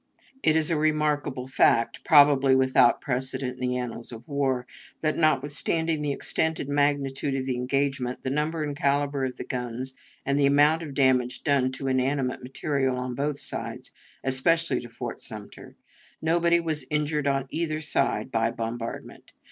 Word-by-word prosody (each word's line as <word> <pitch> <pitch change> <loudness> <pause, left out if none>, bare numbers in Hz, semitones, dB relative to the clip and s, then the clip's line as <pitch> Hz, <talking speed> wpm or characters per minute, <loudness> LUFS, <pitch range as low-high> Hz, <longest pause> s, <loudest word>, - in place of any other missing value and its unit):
It 155 - +3
is 160 +1 +1
a 160 - +2
remarkable 150 -4 0
fact 115 -3 +2
probably 140 -3 +6
without 130 -2 +4
precedent 130 -1 -3
in 125 - 0
the 125 - -1
annals 120 -1 -5
of 115 +5 -10
war 135 -4 0 0.4
that, 155 -1 +1
notwithstanding 155 +1 +1
the 145 -1 -1
extent 160 +3 -1
and 140 - -4
magnitude 140 -1 0
of 130 -1 -2
the 130 -1 -1
engagement, 130 0 -1
the 130 - -2
number 155 +3 -1
and 145 -1 -3
caliber 140 -2 0
of 130 - -5
the - - -5
guns, 125 +1 -4 0.3
and 140 +1 +1
the 140 - +5
amount 145 +3 +4
of 145 -4 -7
damage 130 -3 +2
done 135 -3 +2
to 135 +1 -5
inanimate 130 0 0
material 135 0 -1
on 125 0 -3
both 140 +3 -2
sides, - - -5 0.3
especially 135 +6 +1
to 120 - -9
Fort - - -6
Sumter, - - -9 0.4
nobody 170 +1 +3
was 160 -3 -2
injured 150 -1 0
on 135 -1 +1
either 155 -2 -1
side 150 -3 0
by 115 0 +1
the 115 - -9
bombardment. 115 0 -6
140 Hz, 165 wpm, -26 LUFS, 130-150 Hz, 0.4 s, probably